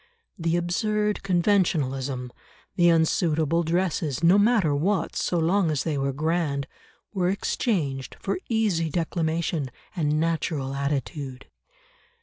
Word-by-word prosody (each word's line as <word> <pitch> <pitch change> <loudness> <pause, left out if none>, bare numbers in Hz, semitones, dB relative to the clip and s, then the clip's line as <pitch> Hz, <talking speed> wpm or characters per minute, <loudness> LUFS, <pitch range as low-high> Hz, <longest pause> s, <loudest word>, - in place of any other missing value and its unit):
The 165 0 +1
absurd 210 +4 0
conventionalism, 145 - 0 0.4
the 175 -1 +5
unsuitable 160 -1 +2
dresses, 165 -3 -1
no 180 +4 +6
matter 205 -8 +3
what, 165 +4 0
so 175 - 0
long 170 +2 +2
as 150 -4 0
they 160 -3 -1
were 135 0 0
grand, 150 -1 -1 0.5
were 180 -3 +1
exchanged 165 - -1
for 200 - -2
easy 205 -8 +1
declamation 165 -2 -1 0.3
and 150 -3 +1
natural 160 -4 -1
attitude. 140 -1 -3
165 Hz, 115 wpm, -25 LUFS, 145-180 Hz, 0.5 s, no